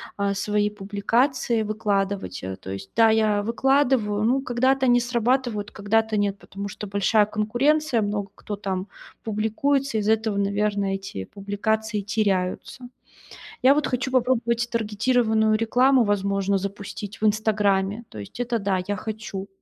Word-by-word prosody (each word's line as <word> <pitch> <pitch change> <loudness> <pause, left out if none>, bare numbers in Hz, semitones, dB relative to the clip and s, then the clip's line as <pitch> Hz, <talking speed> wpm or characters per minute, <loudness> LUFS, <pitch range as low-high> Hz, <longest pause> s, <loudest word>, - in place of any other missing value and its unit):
а, 200 0 0
свои 210 +1 0
публикации 220 +5 0
выкладывать. 205 -2 -2
Э, 95 0 -4
то 95 - -9
есть, 95 0 -7
да, 225 -1 +6
я 215 -2 +2
выкладываю, 235 -3 +2
ну, 255 +5 +2
когда-то 260 +1 +1
они 245 0 +5
срабатывают, 240 -3 0
когда-то 220 +1 0
нет, 205 -1 0
потому 200 +1 -7
что 205 +1 -7
большая 200 +2 +3
конкуренция, 240 +6 +1
много 205 -1 -2
кто 210 - -6
там 195 -1 -4 0.4
публикуется. 225 +5 0
Из-за 215 +1 +3
этого, 220 -2 -1
наверное, 200 0 0
эти 190 - -6
публикации 210 - -2
теряются. 205 +3 -2 0.7
Я 265 +2 +6
вот 300 -1 +1
хочу 255 +1 -2
попробовать 240 -2 +1
таргетированную 220 0 +2
рекламу, 250 +3 +3
возможно, 200 -1 +1
запустить 200 +1 -6
в - - +1
"Инстаграме". 210 -1 +1
То - - -12
есть 100 - -10
это 240 -1 0
да, 195 -3 0
я 205 - -1
хочу. 210 -2 -6
215 Hz, 140 wpm, -24 LUFS, 200-235 Hz, 0.7 s, да